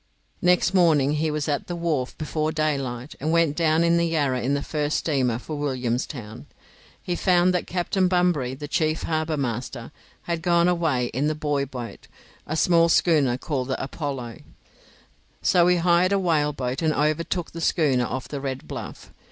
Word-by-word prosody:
Next 180 Hz, +1 st, +3 dB
morning 160 Hz, -7 st, +4 dB
he 155 Hz, +1 st, 0 dB
was 150 Hz, 0 st, -2 dB
at 145 Hz, -2 st, -1 dB
the 175 Hz, -, -4 dB
wharf 160 Hz, -7 st, -2 dB
before 155 Hz, 0 st, -2 dB
daylight, 140 Hz, -5 st, -2 dB
and 155 Hz, +4 st, -1 dB
went 165 Hz, -3 st, +2 dB
down 160 Hz, -1 st, +2 dB
the 170 Hz, 0 st, +3 dB
Yarra 145 Hz, -6 st, 0 dB
in 140 Hz, +3 st, 0 dB
the 140 Hz, -, -2 dB
first 150 Hz, -1 st, -1 dB
steamer 130 Hz, -7 st, 0 dB
for 150 Hz, +4 st, -6 dB
Williamstown. 125 Hz, -3 st, -3 dB, 0.6 s
He 175 Hz, -2 st, -2 dB
found 180 Hz, 0 st, +3 dB
that 180 Hz, -, -1 dB
Captain 185 Hz, +1 st, 0 dB
Bunbury, 175 Hz, -8 st, +1 dB
the 145 Hz, +2 st, -7 dB
chief 155 Hz, +1 st, 0 dB
harbour 155 Hz, -1 st, -1 dB
master, 120 Hz, -1 st, -4 dB, 0.3 s
had 170 Hz, -1 st, -3 dB
gone 170 Hz, 0 st, +3 dB
away 160 Hz, -9 st, +1 dB
in 135 Hz, +5 st, 0 dB
the 155 Hz, -, 0 dB
buoy 145 Hz, -2 st, -1 dB
boat, 125 Hz, -5 st, -8 dB, 0.4 s
a 155 Hz, -, -2 dB
small 170 Hz, 0 st, +4 dB
schooner 150 Hz, -8 st, +3 dB
called 130 Hz, -2 st, -3 dB
the 130 Hz, -, -2 dB
'Apollo', 135 Hz, -5 st, -5 dB, 1.0 s
so 175 Hz, -1 st, +4 dB
he 180 Hz, 0 st, +4 dB
hired 175 Hz, +2 st, +3 dB
a -, -, +3 dB
whale 160 Hz, -6 st, +1 dB
boat, 130 Hz, -1 st, -3 dB
and 155 Hz, -2 st, +1 dB
overtook 160 Hz, +3 st, -1 dB
the 165 Hz, -, -7 dB
schooner 140 Hz, -7 st, +2 dB
off 130 Hz, 0 st, -4 dB
the 140 Hz, -2 st, -5 dB
Red 135 Hz, -1 st, -5 dB
Bluff. -, -, -8 dB
155 Hz, 175 wpm, -24 LUFS, 135-170 Hz, 1.0 s, morning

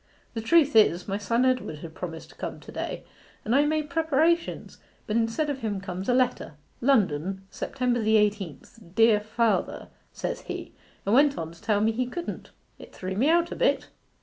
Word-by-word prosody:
'The 225 Hz, -, -3 dB
truth 295 Hz, +4 st, +4 dB
is, 185 Hz, -5 st, +4 dB
my 200 Hz, 0 st, -2 dB
son 230 Hz, +4 st, +1 dB
Edward 255 Hz, -11 st, 0 dB
had 160 Hz, +1 st, -9 dB
promised 165 Hz, -2 st, -7 dB
to -, -, -17 dB
come -, -, -6 dB
to -, -, -12 dB
day, -, -, -4 dB, 0.4 s
and 220 Hz, -, 0 dB
I 290 Hz, +2 st, +4 dB
made 305 Hz, 0 st, 0 dB
preparations; 325 Hz, +1 st, +1 dB, 0.3 s
but 215 Hz, -, -2 dB
instead 230 Hz, +7 st, +1 dB
of 285 Hz, -2 st, -2 dB
him 210 Hz, -5 st, -2 dB
comes 190 Hz, +1 st, -5 dB
a -, -, +4 dB
letter: 250 Hz, -, 0 dB, 0.3 s
"London, 190 Hz, -, +1 dB
September 250 Hz, -2 st, -1 dB
the 220 Hz, 0 st, +3 dB
eighteenth, 205 Hz, -3 st, -1 dB, 0.2 s
Dear 225 Hz, -2 st, +5 dB
Father," 220 Hz, +2 st, -1 dB, 0.2 s
says -, -, -4 dB
he, -, -, -7 dB, 0.3 s
and 200 Hz, -, +1 dB
went 280 Hz, +2 st, +5 dB
on 160 Hz, 0 st, -4 dB
to 170 Hz, -, -16 dB
tell 210 Hz, -2 st, +1 dB
me 220 Hz, +1 st, +3 dB
he 250 Hz, +2 st, -1 dB
couldn't. 345 Hz, +7 st, -6 dB, 0.3 s
It -, -, -13 dB
threw 190 Hz, 0 st, -4 dB
me 260 Hz, +9 st, +2 dB
out 340 Hz, +1 st, +3 dB
a -, -, -3 dB
bit. -, -, +1 dB
225 Hz, 190 wpm, -26 LUFS, 195-275 Hz, 0.4 s, Dear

